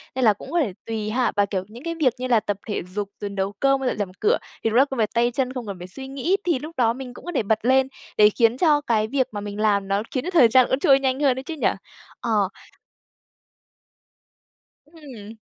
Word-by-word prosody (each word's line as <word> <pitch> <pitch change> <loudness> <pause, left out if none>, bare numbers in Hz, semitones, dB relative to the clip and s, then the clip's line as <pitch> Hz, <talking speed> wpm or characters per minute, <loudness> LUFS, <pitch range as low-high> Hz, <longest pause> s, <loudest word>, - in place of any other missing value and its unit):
nên 260 -1 +1
là 215 - +6
cũng 200 - -11
có 345 - +1
thể 240 - 0
tùy 220 -2 -3
ha 245 +3 +1
và, 205 0 +3
kiểu, 190 -2 -3
những 235 +5 -12
cái 335 0 -3
việc 285 -7 +2
như 255 +1 -3
là 240 -3 +4
tập 205 -1 -3
thể 210 - -2
dục, 205 -1 -2
rồi 205 - -4
nấu 195 0 -2
cơm 275 0 +3
với 265 -1 0
dọn - - -3
dẹp 205 -2 -1
nhà 185 - -15
cửa 445 +4 +3 0.3
thì 225 - +2
đúng 225 - +1
là 270 - +6
công 270 -2 -6
việc 215 -2 +2
tay 240 +1 +2
chân, 255 +1 -1
không 250 -4 -6
cần 200 - -4
phải 180 - -8
suy 265 +8 -8
nghĩ 280 +8 0
thì 335 -7 +1
lúc 310 +4 -9
đó 230 -2 +3
mình 255 0 -8
cũng - - -13
có 350 - -4
thể 260 - +1
bật 215 +1 +1
lên, 265 +1 +4 0.3
để 210 0 +7
khiến 230 +2 +2
cho 295 -2 +3
cái 220 -5 +1
việc 260 +2 0
mà 205 - -5
mình 205 0 -6
làm 200 -2 +2
nó 200 +2 0
khiến 255 - -2
cho - - -3
thời 310 -9 +6
gian 255 +2 +5
trôi 275 -1 +5
nhanh 265 -1 0
hơn 270 -3 +2
ấy - - -7
chứ 330 - -6
nhỉ? 300 - +1 0.5
Ờ. 210 -5 +1 2.4
Ừm. 270 -10 -12
245 Hz, 260 wpm, -23 LUFS, 210-270 Hz, 2.4 s, để